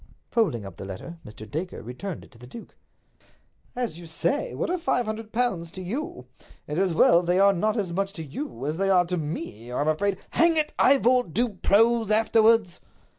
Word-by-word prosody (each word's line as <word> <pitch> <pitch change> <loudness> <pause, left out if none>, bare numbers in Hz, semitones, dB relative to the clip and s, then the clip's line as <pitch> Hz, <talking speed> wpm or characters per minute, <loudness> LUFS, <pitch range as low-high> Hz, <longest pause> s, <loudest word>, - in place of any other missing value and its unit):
Folding 185 - +1
up 95 -2 -10
the - - -7
letter, 100 - -8
Mr. 110 0 -11
Dacre 165 - -5
returned 145 - -6
it - - -18
to 115 - -19
the 125 - -12
duke. 230 - -11 1.0
"As 240 -9 -3
you 170 - -10
say, 280 - -1
what - - -2
are 365 - -1
five 250 -7 0
hundred 215 0 -5
pounds 225 -9 -1
to 185 - -7
you? 200 - -5 0.4
It's 150 +3 -2
as 190 -2 +2
well 170 +1 +5
they 175 +1 +1
are 200 +1 +5
not 215 +5 0
as 190 -5 -2
much 195 +2 -1
to 165 - -6
you 140 - -6
as 155 +2 -2
they 195 +1 +1
are 180 -2 +4
to 180 +1 -2
me, 145 -7 -5
or 125 - -2
I'm 145 - 0
afraid—" 190 +5 +1
"Hang 330 -1 +3
it, 305 -1 0
Ivor, 255 -3 +4
do 240 +7 +1
prose 225 +3 +2
afterwards!" 220 -3 +3
195 Hz, 205 wpm, -25 LUFS, 160-230 Hz, 1.0 s, well